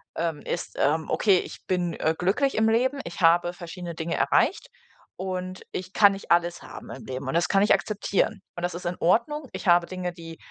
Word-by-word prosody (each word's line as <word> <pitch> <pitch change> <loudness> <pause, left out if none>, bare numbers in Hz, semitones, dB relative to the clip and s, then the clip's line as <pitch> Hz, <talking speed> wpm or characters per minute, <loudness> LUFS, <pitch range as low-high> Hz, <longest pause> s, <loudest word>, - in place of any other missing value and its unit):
ähm, 165 -3 -2
ist, 175 - -5
ähm, 155 +3 +1
okay, 195 -4 +4
ich - - -9
bin, 180 -2 0
äh, 160 +1 0
glücklich 220 +10 +1
im 220 0 +3
Leben, 260 +5 +1
ich 170 - -8
habe 175 +1 +4
verschiedene 175 -1 -7
Dinge 165 +1 -3
erreicht - - +2 0.5
und 185 0 -4
ich 185 +1 -6
kann 205 -2 +6
nicht 195 - -8
alles 175 0 +2
haben - - -10
im 130 - -9
Leben 130 +1 -5
und 135 - -2
das 170 - +2
kann 195 -1 +3
ich 210 - +5
akzeptieren. 210 0 0
Und 175 - -6
das 175 - -1
ist 175 - -7
in 175 +1 -2
Ordnung, 270 - +1
ich - - -6
habe 175 0 +5
Dinge, 185 -1 -4
die 165 -2 -10
180 Hz, 210 wpm, -26 LUFS, 170-200 Hz, 0.5 s, kann